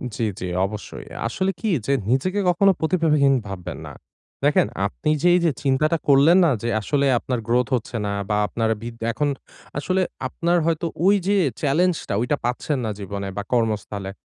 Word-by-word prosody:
জ্বী, 115 - -1
জ্বী 90 - -4 0.2
অবশ্যই। 105 +1 -7 0.2
আসলে 190 +11 -1
কি 220 - -1 0.2
যে 140 - +1 0.2
নিজেকে 185 +11 +1
কখনো 195 +3 +4
প্রতিভাবহীন 155 -5 +3
ভাববেন 95 -3 -6
না। - - -9 0.5
দেখেন 145 -7 +3 0.2
আপনি 150 +9 -3
যে 180 - +3
এইযে 170 -3 +2
চিন্তাটা 150 +4 +2
করলেন 145 +6 +6
না 155 - +3
যে, 115 - -2
আসলে 140 +5 0
আপনার 125 -1 -3
গ্রোথ 120 +1 +2
হচ্ছে 120 0 -5
না 100 - -1 0.2
বা 105 - +1
আপনার 115 0 -1
ভিত 115 0 -7 0.2
এখন 145 +3 0 0.5
আসলে 185 +6 0 0.3
আপনার 170 +5 0
হয়তো 165 0 0 0.2
ওই 200 +1 +6
যে 205 - +3 0.3
চ্যালেঞ্জ 165 +5 +2
টা - - 0
ওইটা 140 +4 0
পাচ্ছেন 130 +4 -1
না 110 - -1
জীবনে 100 0 -5
বা 100 - -2
কর্মস্থলে। 105 -4 -1
140 Hz, 175 wpm, -22 LUFS, 115-165 Hz, 0.5 s, করলেন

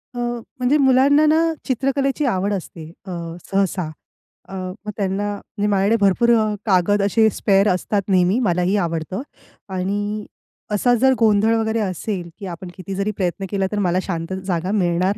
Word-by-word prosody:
अ, - - -4
म्हणजे 240 +3 -1
मुलांना 275 +2 +5
ना, 325 +2 +3
चित्रकलेची 275 +3 0
आवड 200 -4 0
असते 165 -4 -6 0.2
अ, 190 - -7 0.4
सहसा. 195 -4 0 0.6
अ, - - -9
मग 190 +2 -6
त्यांना 200 +1 -1
म्हणजे 205 +1 -4
माझ्याकडे 200 +2 +3
भरपूर 200 +4 +3
अ, 215 -1 0
कागद 205 0 +3
असे 220 +2 +3
स्पेअर 200 -1 +2
असतात 200 +3 0
नेहमी 185 +3 +3
मलाही 180 -4 +1
आवडतं 165 +4 -3 0.5
आणि 205 +3 -2 0.5
असा 245 +4 +2
जर 265 0 +5
गोंधळ 220 0 +4
वगैरे 225 0 0
असेल 185 -2 -3
की 200 - -7
आपण 175 +2 -8
किती 190 +1 -6
जरी 200 +2 -1
प्रयत्न 190 +1 -2
केला 195 -2 0
तर 210 - -1
मला 180 -2 +1
शांत 170 -1 -4
जागा 180 0 -1
मिळणार 185 -1 +1
200 Hz, 160 wpm, -21 LUFS, 185-225 Hz, 0.6 s, मुलांना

